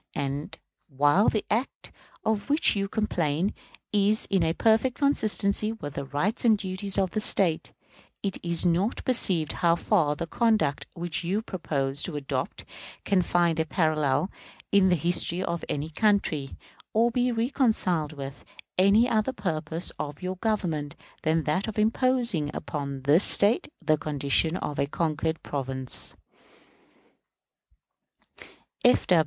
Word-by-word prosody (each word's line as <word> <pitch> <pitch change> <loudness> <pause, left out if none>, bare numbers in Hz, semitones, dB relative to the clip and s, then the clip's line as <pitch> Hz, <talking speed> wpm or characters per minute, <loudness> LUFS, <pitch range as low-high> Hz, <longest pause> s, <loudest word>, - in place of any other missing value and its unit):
And, 140 +1 -3 0.3
while 145 +8 +3
the 215 - -2
act 235 +5 -2 0.3
of 220 +2 -1
which 295 -3 +4
you 195 -1 -1
complain 180 -5 -1 0.4
is 210 +1 +2
in 170 -5 +2
perfect 225 +3 +2
consistency 215 -6 +1
with 145 -10 -7
the 140 - -4
rights 145 - -2
and 225 -3 +5
duties 190 0 -3
of 190 -2 +1
the 215 - -1
State, 180 -6 0 0.5
it 195 -2 -2
is 170 0 +1
not 180 +7 0
perceived 180 - +2
how 170 -1 +4
far 170 -5 +1
the 170 - -4
conduct 215 - +1
which 175 -1 -2
you 195 +6 -1
propose 140 -8 -1
to 175 - -3
adopt 135 -2 -4 0.4
can 195 -2 +3
find 170 -2 +1
a - - +3
parallel 155 +2 +1 0.4
in 195 -2 +5
the 180 - +4
history 175 +2 0
of 170 -2 -3
any 150 +2 -3
country, 160 -7 0 0.4
or 230 +2 +3
be 245 +1 +1
reconciled 225 - 0
with 135 -2 -8 0.4
any 200 +5 +5
other 225 +2 0
purpose 165 - -3
of 145 -1 -5
your 185 0 -3
Government 170 -9 -2 0.3
than 160 0 +1
that 155 +8 -1
of 220 - -6
imposing 230 - +1
upon 140 -2 -5
this 150 +7 +4
State 205 +4 +3
the 155 -3 +1
condition 150 +3 +1
of 150 - -4
a 140 - +1
conquered 160 +1 -2
province. 130 -2 -1
175 Hz, 135 wpm, -26 LUFS, 150-210 Hz, 0.5 s, and